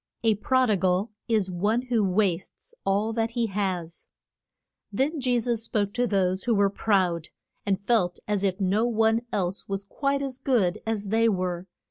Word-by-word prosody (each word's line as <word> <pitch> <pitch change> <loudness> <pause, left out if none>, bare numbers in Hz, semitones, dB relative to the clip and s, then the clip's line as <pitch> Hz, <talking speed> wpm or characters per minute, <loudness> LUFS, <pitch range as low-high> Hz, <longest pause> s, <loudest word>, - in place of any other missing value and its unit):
A 225 -1 +4
prod 255 +3 +2
i 205 - +3
gal 185 +4 +1 0.2
is 215 -5 +1
one 210 +7 0
who 240 -4 +1
wastes 190 -2 -1
all 205 +3 +1
that 225 0 0
he 235 -1 +1
has. 185 -5 -3 0.8
Then 275 +9 0
Je 250 -1 +2
sus 235 -1 0
spoke 205 -3 -1
to 245 0 +1
those 190 -2 0
who 235 -2 +2
were 200 -1 +3
proud, 185 -6 +1 0.4
and 200 0 0
felt 190 -7 +2
as 205 -2 0
if 190 0 0
no 195 +3 +2
one 225 0 +2
else 185 -1 -2
was 195 0 -2
quite 275 +7 -1
as 265 -2 -5
good 210 -10 +1
as 210 -3 -2
they 225 +2 +3
were. 180 -2 -2
205 Hz, 175 wpm, -26 LUFS, 190-230 Hz, 0.8 s, A